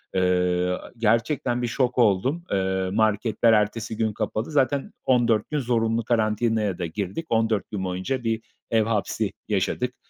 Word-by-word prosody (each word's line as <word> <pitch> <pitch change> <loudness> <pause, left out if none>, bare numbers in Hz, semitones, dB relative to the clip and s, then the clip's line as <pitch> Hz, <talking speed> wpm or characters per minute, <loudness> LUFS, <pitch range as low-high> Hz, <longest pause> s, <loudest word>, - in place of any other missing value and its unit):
Eee, 90 0 +1 0.2
gerçekten 120 +3 +1
bir 120 - 0
şok 125 +1 0
oldum. 125 - +2
Eee, 95 -1 0
marketler 110 +1 +2
ertesi 110 +1 0
gün 110 -2 0
kapalı. 110 +5 -3
Zaten 140 -1 +1
14 120 -4 +2
gün 150 -1 0
zorunlu 115 -2 0
karantinaya 110 -3 +1
da 90 - -2
girdik. 100 - -4
14 110 -2 +1
gün 95 -3 -3
boyunca 95 +8 -2
bir 115 -1 -1 0.3
ev 110 -1 +4
hapsi 110 -1 -1
yaşadık. 110 +5 -1
110 Hz, 145 wpm, -24 LUFS, 100-120 Hz, 0.3 s, ev